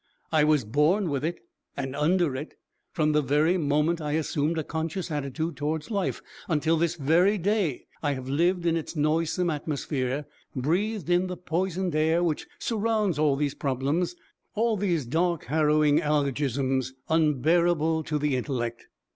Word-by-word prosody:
I 155 -2 +4
was 150 -6 +3
born 150 - +2
with 140 -1 -1
it 170 +2 -2 0.4
and 135 -1 -3
under 155 0 +2
it. 145 +4 -6 0.4
From 155 -3 +1
the 150 0 +3
very 150 +6 +2
moment 150 +2 +1
I 150 -1 -2
assumed 155 0 0
a 160 - 0
conscious 165 +3 -3
attitude 150 +3 -3
towards 150 +5 -3
life 200 -3 -1 0.2
until 160 0 +2
this 170 +1 0
very 175 +7 +3
day 195 - 0 0.2
I 145 -2 0
have 130 -1 -6
lived 170 +6 +1
in 165 -1 +2
its 165 +1 -4
noisome 165 +3 +1
atmosphere, 145 -2 -2 0.3
breathed 180 - -1
in 180 +1 +3
the 180 -1 -5
poisoned 180 0 -2
air 160 +3 +2
which 160 -3 -1
surrounds 215 - 0
all 150 -3 +3
these 145 0 -1
'problems,' 145 +7 -1 0.4
all 225 +1 +2
these 180 -8 0
dark, 170 +5 0
harrowing 150 +1 +3
alogisms, 135 -3 0
unbearable 160 +1 +2
to 150 - -1
the 145 -2 0
intellect. 120 -3 -3
155 Hz, 155 wpm, -27 LUFS, 145-175 Hz, 0.4 s, I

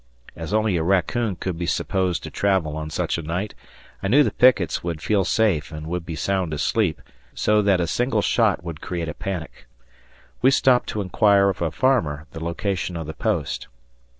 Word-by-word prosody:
As 80 +2 -6
only 110 -3 +2
a - - 0
raccoon 95 +4 +1
could 90 -1 -4
be 85 - -2
supposed 95 -4 0
to - - -7
travel 95 -7 0
on 80 0 -4
such 75 - -1
a - - -3
night, 85 +7 -3 0.5
I 95 - -1
knew 140 +9 +5
the - - 0
pickets 120 -10 +3
would 85 -3 -3
feel 100 +4 +1
safe 95 -8 +1
and 75 -1 -7
would 85 +1 -4
be 80 - -4
sound 90 0 -1
asleep, 80 +5 0 0.3
so 105 0 +3
that 100 -3 +3
a 85 - +1
single 115 +4 0
shot 110 -7 +2
would 85 -3 -7
create 85 -2 -4
a - - -4
panic. 95 -5 -6 0.7
We 130 - +6
stopped 130 -2 +3
to 105 - -2
inquire 100 +1 +3
of 95 - -4
a 85 - +1
farmer 80 - +1
the 80 - -7
location 90 +1 -2
of 80 - -5
the 80 - -6
post. - - -2
90 Hz, 195 wpm, -23 LUFS, 80-105 Hz, 0.7 s, We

